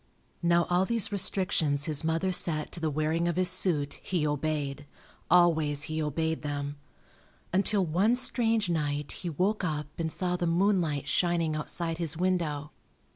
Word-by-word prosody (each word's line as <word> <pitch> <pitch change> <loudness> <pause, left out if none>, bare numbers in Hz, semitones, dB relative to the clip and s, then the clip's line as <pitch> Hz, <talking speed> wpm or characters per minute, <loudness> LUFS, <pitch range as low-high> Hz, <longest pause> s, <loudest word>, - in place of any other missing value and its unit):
Now 170 -1 +3
all 180 +2 +2
these 230 -1 +1
restrictions 180 -7 +1
his 155 -2 -1
mother 165 +4 0
set 155 -4 -1
to - - -5
the 160 -1 -1
wearing 155 +3 0
of 170 - 0
his 185 0 +4
suit 165 -6 +2
he 175 -5 -1
obeyed, 145 -1 -2 0.4
always 160 -4 +4
he 155 +1 -3
obeyed 160 +2 -1
them, 145 -1 -4 0.8
until 195 0 +2
one 190 +9 +2
strange 230 -4 0
night 150 -3 -2
he 175 - -5
woke 190 +7 0
up 150 -4 -2
and 160 -1 -1
saw 180 +2 -1
the 175 - -1
moonlight 170 -4 +1
shining 170 -3 +1
outside 165 +2 -2
his 165 -2 -2
window. 165 -5 -1
165 Hz, 155 wpm, -28 LUFS, 150-180 Hz, 0.8 s, his